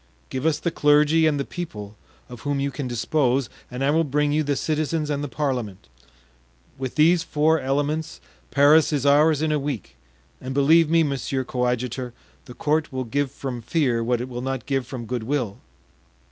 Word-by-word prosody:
Give 130 +4 -1
us 155 -2 +2
the 165 +2 -2
clergy 150 +2 +4
and 145 -2 +1
the 140 - -2
people, 105 - -7 0.3
of 125 -2 -10
whom 145 -1 -1
you 140 0 -1
can 140 -1 -4
dispose, 125 0 0 0.2
and 125 +2 -4
I 140 - +3
will 165 +2 +3
bring 150 0 0
you 150 +1 +2
the 145 -1 0
citizens 155 +1 -1
and 145 0 -2
the - - -2
parliament; 125 - -3 0.9
with 130 -2 -5
these 165 +3 +4
four 160 0 +2
elements 145 +4 -2 0.3
Paris 145 +3 +5
is 145 -2 -1
ours 150 +2 +4
in 155 - +1
a 150 - +1
week; 130 - -5 0.5
and 130 +1 -5
believe 155 +3 +5
me, 165 0 +4
monsieur 135 -2 -2
coadjutor, 125 0 -2 0.3
the 125 - -11
court 155 +1 0
will 130 -1 -3
give 140 +4 -1
from 130 -4 -5
fear 120 -2 0
what 120 0 0
it 125 - -4
will 120 -1 -6
not 135 -2 -3
give 135 -3 -1
from 125 -4 -6
good 125 +1 -3
will." 120 -4 -2
140 Hz, 190 wpm, -23 LUFS, 125-150 Hz, 0.9 s, Paris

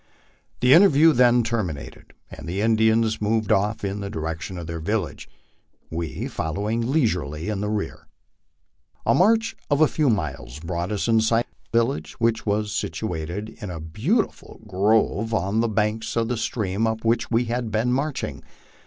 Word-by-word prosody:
The 125 +1 +6
interview 165 -3 +7
then 120 -1 +5
terminated, 95 -12 -4 0.2
and - - -9
the 95 +3 -2
Indians 110 0 +2
moved 110 0 0
off 105 +1 +1
in 100 +1 -3
the 100 -1 -4
direction 80 +2 -4
of 85 - -6
their 85 0 -5
village, 95 -2 -3 0.6
we 80 -4 -4
following 105 +9 -2
leisurely 90 - 0
in 105 -1 -2
rear. 80 -7 -3 1.0
A - - +4
march 225 +4 +3
of 145 -1 +2
a 155 - +6
few 150 -2 +1
miles 75 - -2
brought 85 +3 -3
us 105 +1 -1
in 115 -1 +4
sight 115 +1 +2
of - - -38
the 115 - +2
village, 115 +4 0
which 115 -1 0
was 105 0 0
situ 110 -2 -3
ated 85 +7 -4
in 105 - -5
a 85 -2 -5
beautiful 115 - -2
grove 105 +2 +1
on 100 +2 0
the 115 0 +2
banks 105 +1 -1
of 115 -1 0
the 125 - 0
stream 110 -1 -1
up 110 0 -3
which 115 0 +1
we 120 +1 +2
had 120 0 -2
been 115 +3 +1
marching. 130 - -2
110 Hz, 170 wpm, -24 LUFS, 90-115 Hz, 1.0 s, interview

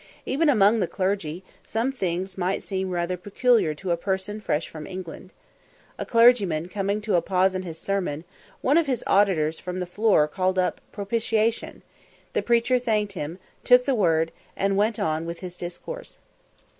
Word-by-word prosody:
Even 300 +4 +2
among 215 -3 +4
the 185 - +1
clergy, 185 -3 -2 0.2
some 230 +4 0
things 185 -5 -3
might 185 +1 -1
seem 190 -1 -3
rather 175 0 -1
peculiar 205 -2 +2
to 180 +4 -4
a - - +3
person 190 +3 -3
fresh 155 -6 -1
from 155 -1 -9
England. 185 0 -8 0.7
A - - -4
clergyman 210 -9 +4
coming 200 +1 -1
to 215 -1 -2
a 175 - +4
pause 190 +1 +2
in 185 - -2
his 165 -3 -7
sermon, 180 -5 -2 0.4
one 285 +5 +4
of 325 - 0
his 255 -4 -1
auditors 165 -6 +2
from 180 0 -5
the 180 - -2
floor 185 -4 +3
called 185 +3 -1
up 185 -1 0
"Propitiation;" 220 +2 -1 0.5
the - - +1
preacher 240 +2 +2
thanked 215 -4 0
him, 165 -1 -5 0.3
took 250 0 +6
the 275 - +2
word, 165 -7 +2 0.3
and 195 0 +1
went 210 +2 +1
on 160 +1 -1
with 170 0 -6
his 180 -1 -7
discourse. 180 - -8
190 Hz, 170 wpm, -25 LUFS, 175-220 Hz, 0.7 s, took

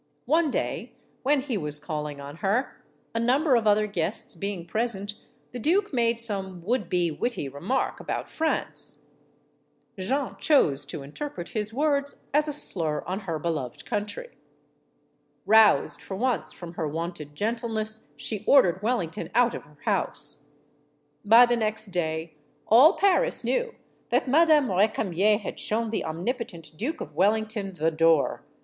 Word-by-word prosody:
One 320 0 +3
day, 240 -2 -3 0.3
when 280 +1 +2
he 260 -6 -2
was 150 -2 -2
calling 150 -1 -5
on 140 +2 -9
her, 205 +9 -1 0.3
a 230 - 0
number 260 +4 +3
of 225 -2 +2
other 210 +1 +4
guests 185 -6 -3
being 190 0 -4
present, 210 +1 -2 0.4
the 250 - -6
duke 355 - +1
made 235 -2 +2
some 190 -6 -1
would 215 -2 -1
be 175 -2 +1
witty 235 - -2
remark 170 - -2
about - - -4
France. 320 0 -2 1.0
Jeanne 265 +8 -1
chose 145 - +3
to 140 0 -6
interpret 175 - -6
his 215 -2 -2
words 285 +2 0 0.2
as 300 +1 +4
a - - -1
slur 165 - +2
on 185 +3 -3
her 160 - -1
beloved 150 -6 -4
country. 210 - -4 1.2
Roused 220 +1 +5
for 190 - -6
once 250 +2 0
from 175 -1 -9
her 160 -2 -2
wonted 155 -1 -5
gentleness, 220 +2 -3
she 215 -3 -4
ordered 190 -10 +5
Wellington 210 -8 -2
out 245 -1 +4
of - - -5
her 150 0 -21
house. - - -2 0.8
By 230 +4 +8
the 240 0 +1
next 215 -1 -1
day 160 -2 -2 0.3
all 260 - +7
Paris 400 +6 +2
knew - - -1 0.3
that - - +1
Madame 300 -3 +4
Re 190 +3 +4
camier 210 0 +1
had 210 - -6
shown 225 +1 0
the 225 - -1
omnipotent 170 - -4
Duke 255 - -3
of - - -7
Wellington 210 0 0
the 165 0 +1
door. 165 -2 +2
215 Hz, 150 wpm, -26 LUFS, 170-250 Hz, 1.2 s, By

